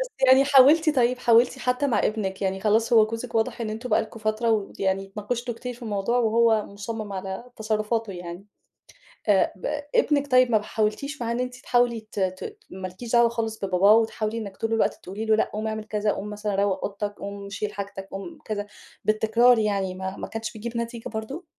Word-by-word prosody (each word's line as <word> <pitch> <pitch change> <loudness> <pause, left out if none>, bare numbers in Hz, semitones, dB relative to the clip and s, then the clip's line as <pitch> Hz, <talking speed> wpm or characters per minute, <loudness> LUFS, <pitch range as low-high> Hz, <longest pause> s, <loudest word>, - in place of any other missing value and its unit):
بس - - -2 0.2
يعني 260 +1 +7
حاولتِ 290 +3 +6
طيب 250 0 +3
حاولتِ 240 +1 +4
حتى 250 +2 0
مع 255 - +1
ابنِك 200 -3 -1
يعني 190 0 -1
خلاص 220 +3 +2
هو 220 -2 +7
جوزِك 230 +2 -6
واضح 225 +1 0
إن 220 - -2
أنتم 230 +3 -5
بقى 215 - +4
لكم 220 +1 -10
فترة 215 +2 0
ويعني 195 -2 -1
اتناقشتوا 230 +5 -4
كتير 250 +2 -6
في 245 - -16
الموضوع 215 +2 0
وهو 225 -2 +3
مصمّم 205 +1 -6
على 190 +3 -5
تصرفاتُه 215 0 -1
يعني، 175 +1 -8 0.8
آآ، 200 -2 +3
ب 185 - -9 0.3
ابنِك 285 -2 +2
طيب 255 -1 +5
ما 215 -2 +4
حاولتيش 225 +7 -2
معاه 235 0 -1
إن 235 - -1
أنتِ 250 0 -3
تحاولي 245 -1 +1
ت - - -5
ت 190 - -3
ما 185 0 -6
لكيش 205 +6 -9
دعوى 235 -1 +5
خالص 225 -1 -3
بباباه 190 +2 +5
وتحاولي 220 0 0
إنِّك 200 -4 -6
طول 225 0 -2
الوقت 225 - +2
تقولي 200 +4 -5
له 220 -1 +4
لأ، - - +1
قوم 215 +1 -2
اعمل 220 0 -3
كذا، 210 -1 0
قوم 205 +1 -5
مثلًا 210 -1 -3
روّق 195 -1 0
أوضتك، 205 0 -4
قوم 200 0 -7
شيل 205 +1 -4
حاجتك، 195 -1 -6
قوم 195 +13 -7
كذا، 205 -1 -3 0.4
بالتكرار 220 +3 +4
يعني 200 -3 0
ما 190 +1 -5
ما - - -5
كانتش 225 0 -5
بتجيب 235 +2 -5
نتيجة 235 0 -4
برضه؟ 230 - -6
220 Hz, 200 wpm, -25 LUFS, 200-235 Hz, 0.8 s, يعني